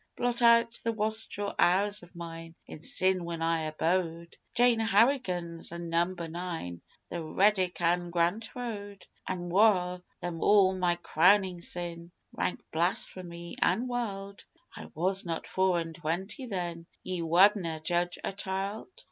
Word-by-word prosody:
Blot 245 Hz, 0 st, -1 dB
out 235 Hz, 0 st, +5 dB
the 230 Hz, -, +1 dB
wastrel 215 Hz, -1 st, -2 dB
hours 200 Hz, +4 st, +3 dB
of 175 Hz, +1 st, -16 dB
mine 165 Hz, -1 st, -8 dB
in 150 Hz, -, -10 dB
sin 185 Hz, +1 st, +1 dB
when 170 Hz, -1 st, -4 dB
I 165 Hz, -1 st, +1 dB
abode 165 Hz, +1 st, -1 dB, 0.2 s
Jane 240 Hz, -1 st, +4 dB
Harrigan's 200 Hz, -8 st, +1 dB
an' 170 Hz, 0 st, -6 dB
Number 170 Hz, 0 st, 0 dB
Nine, 165 Hz, -, -5 dB, 0.3 s
The 170 Hz, -, -4 dB
Reddick 185 Hz, +2 st, +2 dB
an' 175 Hz, +1 st, +1 dB
Grant 175 Hz, +6 st, 0 dB
Road! 205 Hz, -5 st, -6 dB, 0.2 s
An' 175 Hz, -1 st, -3 dB
waur 180 Hz, -2 st, +3 dB, 0.2 s
than 175 Hz, -2 st, -4 dB
all 195 Hz, -1 st, +5 dB
my 180 Hz, -2 st, +1 dB
crownin' 185 Hz, +1 st, +3 dB
sin 170 Hz, -1 st, -5 dB, 0.2 s
rank -, -, -2 dB
blasphemy 170 Hz, 0 st, -1 dB
an' 225 Hz, +8 st, +2 dB
wild. 200 Hz, -5 st, -4 dB, 0.3 s
I -, -, -9 dB
was 190 Hz, +4 st, +1 dB
not 165 Hz, -2 st, -4 dB
four 185 Hz, -2 st, +1 dB
and 165 Hz, -1 st, -5 dB
twenty 175 Hz, -, -4 dB
then 175 Hz, -5 st, -4 dB, 0.2 s
Ye 185 Hz, -2 st, -3 dB
wadna' 170 Hz, -1 st, +3 dB
judge 175 Hz, +1 st, 0 dB
a -, -, -2 dB
child? 195 Hz, +2 st, -4 dB
180 Hz, 140 wpm, -29 LUFS, 170-205 Hz, 0.3 s, out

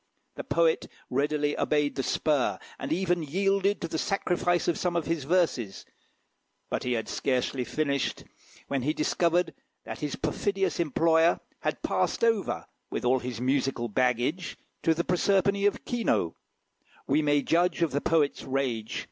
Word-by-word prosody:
The -, -, -6 dB
poet 165 Hz, -1 st, +2 dB, 0.2 s
readily 145 Hz, +2 st, +1 dB
obeyed 150 Hz, -1 st, +1 dB
the 135 Hz, -, -2 dB
spur, 130 Hz, -8 st, +1 dB, 0.2 s
and -, -, -4 dB
even 175 Hz, 0 st, +1 dB
yielded 195 Hz, +5 st, +1 dB
to 170 Hz, -, -2 dB
the 160 Hz, -, -3 dB
sacrifice 175 Hz, -2 st, 0 dB
of 170 Hz, -, +1 dB
some 175 Hz, -1 st, 0 dB
of 170 Hz, -3 st, 0 dB
his 160 Hz, -4 st, -2 dB
verses; 145 Hz, -, 0 dB, 0.9 s
but -, -, -1 dB
he 125 Hz, -, -1 dB
had 115 Hz, -2 st, -2 dB
scarcely 130 Hz, 0 st, -1 dB
finished, 140 Hz, +3 st, -1 dB, 0.4 s
when 140 Hz, -2 st, -1 dB
he 150 Hz, +5 st, 0 dB
discovered 170 Hz, +2 st, +1 dB, 0.3 s
that -, -, -6 dB
his 150 Hz, -2 st, -3 dB
perfidious 190 Hz, +4 st, -1 dB
employer 165 Hz, +1 st, +3 dB, 0.2 s
had -, -, -3 dB
passed -, -, 0 dB
over, 225 Hz, -4 st, +1 dB, 0.2 s
with -, -, -3 dB
all 130 Hz, +1 st, +4 dB
his 125 Hz, -2 st, -5 dB
musical 130 Hz, -2 st, 0 dB
baggage, 125 Hz, -, 0 dB, 0.2 s
to 165 Hz, -, +3 dB
the 170 Hz, -, 0 dB
Proserpine 200 Hz, +2 st, +2 dB
of 205 Hz, -, -2 dB
Quinault. 230 Hz, -, 0 dB, 0.7 s
We 145 Hz, +3 st, +2 dB
may 145 Hz, -1 st, +2 dB
judge 170 Hz, +2 st, +2 dB
of 165 Hz, -, +1 dB
the 140 Hz, +2 st, 0 dB
poet's 155 Hz, -3 st, +1 dB
rage. 130 Hz, -5 st, -2 dB
155 Hz, 155 wpm, -28 LUFS, 135-175 Hz, 0.9 s, all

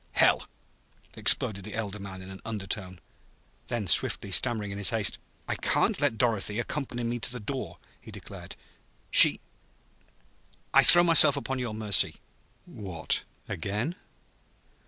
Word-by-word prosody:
"Hell!" -, -, +2 dB, 0.7 s
exploded 100 Hz, -2 st, +2 dB
the 105 Hz, +1 st, -9 dB
elder 105 Hz, -2 st, -6 dB
man 95 Hz, -1 st, -10 dB
in 95 Hz, -, -12 dB
an 95 Hz, -, -13 dB
undertone. 95 Hz, -4 st, -6 dB, 0.7 s
Then 115 Hz, -4 st, -4 dB
swiftly, 95 Hz, +3 st, +1 dB
stammering 110 Hz, -1 st, 0 dB
in 100 Hz, -, -8 dB
his 100 Hz, -, +1 dB
haste: 110 Hz, -3 st, -1 dB, 0.3 s
"I -, -, -2 dB
can't -, -, -1 dB
let 115 Hz, -, -1 dB
Dorothy 105 Hz, -2 st, 0 dB
accompany 120 Hz, 0 st, -5 dB
me 120 Hz, +1 st, -4 dB
to 120 Hz, -, -2 dB
the 125 Hz, -, -4 dB
door," 105 Hz, -7 st, -7 dB, 0.2 s
he -, -, -15 dB
declared. -, -, -12 dB, 0.6 s
"She -, -, +8 dB, 1.3 s
I -, -, +5 dB
I -, -, +5 dB
throw 175 Hz, 0 st, +9 dB
myself 165 Hz, -4 st, +6 dB
upon 135 Hz, -1 st, -5 dB
your 120 Hz, -4 st, -5 dB
mercy!" 110 Hz, -2 st, +1 dB, 0.5 s
"What 90 Hz, -6 st, -5 dB, 0.2 s
again?" 105 Hz, -, -5 dB
105 Hz, 140 wpm, -26 LUFS, 100-120 Hz, 1.3 s, throw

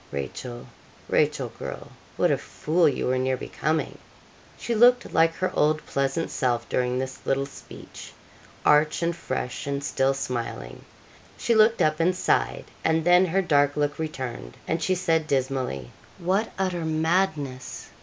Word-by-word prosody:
Rachel, 120 Hz, -, -6 dB, 0.4 s
Rachel, -, -, +1 dB
girl! -, -, -7 dB, 0.3 s
what -, -, +3 dB
a -, -, +2 dB
fool 165 Hz, +1 st, +1 dB
you 135 Hz, -, -2 dB
were 130 Hz, 0 st, +1 dB
near 130 Hz, 0 st, 0 dB
becoming!' 155 Hz, +5 st, -2 dB, 0.6 s
She 235 Hz, -, -3 dB
looked 245 Hz, +2 st, +4 dB
like 165 Hz, 0 st, +4 dB
her 185 Hz, -, -1 dB
old 155 Hz, +1 st, +2 dB
pleasant 140 Hz, +4 st, -1 dB
self 120 Hz, -3 st, 0 dB
during 125 Hz, 0 st, 0 dB
this 130 Hz, 0 st, -4 dB
little 135 Hz, 0 st, 0 dB
speech 140 Hz, -, -11 dB, 0.5 s
arch 150 Hz, +3 st, +4 dB
and 170 Hz, 0 st, 0 dB
fresh, 135 Hz, -6 st, -4 dB
and 140 Hz, 0 st, -2 dB
still 135 Hz, 0 st, +1 dB
smiling 115 Hz, -, -5 dB, 0.5 s
she 235 Hz, -, +1 dB
looked 220 Hz, +1 st, +5 dB
up 155 Hz, +1 st, +1 dB
and 175 Hz, +2 st, +2 dB
sighed, 185 Hz, -, 0 dB, 0.2 s
and 160 Hz, 0 st, +1 dB
then 180 Hz, +1 st, +6 dB
her 190 Hz, +3 st, +1 dB
dark 145 Hz, -4 st, +2 dB
look 145 Hz, 0 st, 0 dB
returned, 130 Hz, -, -5 dB
and 165 Hz, +1 st, -1 dB
she 185 Hz, +3 st, +1 dB
said 165 Hz, -3 st, +1 dB
dismally, 130 Hz, -, -1 dB, 0.3 s
'What 190 Hz, +6 st, 0 dB
utter 185 Hz, -3 st, -1 dB
madness!' 155 Hz, -5 st, -1 dB
150 Hz, 150 wpm, -25 LUFS, 130-170 Hz, 0.6 s, then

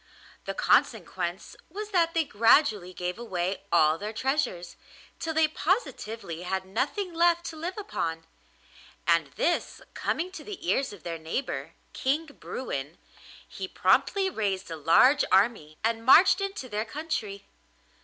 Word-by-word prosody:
The -, -, -4 dB
consequence -, -, 0 dB
was 420 Hz, +1 st, -6 dB
that 335 Hz, -3 st, +2 dB
they 330 Hz, -, +3 dB
gradually 220 Hz, -, +3 dB
gave 180 Hz, +2 st, -4 dB
away 190 Hz, -5 st, -2 dB
all 155 Hz, +1 st, +4 dB
their 210 Hz, +2 st, -5 dB
treasures, 245 Hz, -, -1 dB, 0.4 s
till 325 Hz, -, -2 dB
they 320 Hz, 0 st, +4 dB
positively 230 Hz, -, -2 dB
had 190 Hz, +1 st, -3 dB
nothing 295 Hz, -, -2 dB
left 340 Hz, 0 st, +3 dB
to -, -, -11 dB
live 345 Hz, +5 st, -5 dB
upon; 165 Hz, -, -3 dB, 0.8 s
and 165 Hz, -2 st, +3 dB
this 345 Hz, +1 st, -1 dB
coming 355 Hz, +3 st, -2 dB
to 330 Hz, -5 st, -9 dB
the 390 Hz, -5 st, -8 dB
ears 270 Hz, -, +1 dB
of 200 Hz, -6 st, -12 dB
their 165 Hz, -1 st, -5 dB
neighbour, 160 Hz, +12 st, -4 dB, 0.2 s
King 285 Hz, +5 st, 0 dB
Bruin, 170 Hz, -, -6 dB, 0.5 s
he -, -, -6 dB
promptly 390 Hz, -1 st, +2 dB
raised 195 Hz, -, -2 dB
a -, -, -3 dB
large 255 Hz, -, +5 dB
army 190 Hz, -7 st, +2 dB
and 225 Hz, 0 st, 0 dB
marched 335 Hz, -, +7 dB
into 395 Hz, -9 st, -4 dB
their 210 Hz, -2 st, -2 dB
country. 225 Hz, -7 st, -4 dB
230 Hz, 140 wpm, -27 LUFS, -, 0.8 s, marched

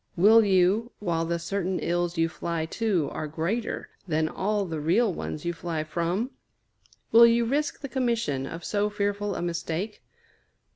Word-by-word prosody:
Will 220 Hz, +5 st, +7 dB
you, 200 Hz, +4 st, +3 dB
while 170 Hz, -4 st, -1 dB
the 170 Hz, +1 st, -1 dB
certain 185 Hz, +1 st, -2 dB
ills 175 Hz, 0 st, -1 dB
you 165 Hz, 0 st, +3 dB
fly 165 Hz, -1 st, -3 dB
to 185 Hz, -3 st, 0 dB
are 155 Hz, -, -4 dB
greater 170 Hz, +10 st, -2 dB, 0.2 s
than 155 Hz, -1 st, +1 dB
all 205 Hz, +4 st, -1 dB
the 160 Hz, -3 st, -4 dB
real 185 Hz, +8 st, +2 dB
ones 155 Hz, -1 st, -5 dB
you 170 Hz, -, 0 dB
fly 165 Hz, -2 st, -3 dB
from? 175 Hz, -, -2 dB, 0.8 s
Will 235 Hz, +1 st, +9 dB
you 235 Hz, 0 st, +3 dB
risk 290 Hz, +5 st, -1 dB
the 280 Hz, -, -4 dB
commission 235 Hz, -, -1 dB
of 165 Hz, +2 st, -7 dB
so 210 Hz, 0 st, 0 dB
fearful 205 Hz, -1 st, -1 dB
a -, -, -3 dB
mistake? 175 Hz, +4 st, -3 dB
185 Hz, 160 wpm, -27 LUFS, 165-215 Hz, 0.8 s, Will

